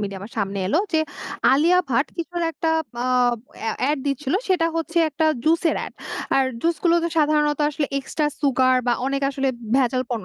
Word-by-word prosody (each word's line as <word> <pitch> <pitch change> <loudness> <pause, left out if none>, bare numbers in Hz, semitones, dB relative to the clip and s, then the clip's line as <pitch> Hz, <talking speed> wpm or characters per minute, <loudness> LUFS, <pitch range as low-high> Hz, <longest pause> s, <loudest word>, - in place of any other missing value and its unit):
মিডিয়ায় 195 -2 -5
আমার 210 - -10
সামনে 200 -1 -2
এল 190 - -1 0.2
যে, 320 - +3 0.5
আলিয়া 335 +7 +4
ভাট 260 +4 +2
কিছুর 345 0 -4
একটা 325 - -2 0.6
আব 240 - 0 0.3
আ - - +1 0.2
এড 300 - 0
দিচ্ছিল 275 +2 -1
সেটা 360 -3 +3
হচ্ছে 330 +1 -1
একটা 310 +1 -1 0.2
জুস 325 +1 +3
এর - - -2
এড। - - -10 0.4
আর 270 - +4 0.2
জুস 335 +3 +1
গুলোতো 340 0 +3
সাধারণত 300 -1 +2
আসলে 290 0 -2
এক্সট্রা 295 +2 -2
সুগার 260 -2 +3
বা 245 - +3
অনেক 275 0 -1
আসলে 270 0 -1 0.3
ভেজাল 255 -1 +2
পণ্য 230 -5 -3
290 Hz, 180 wpm, -22 LUFS, 255-325 Hz, 0.6 s, আলিয়া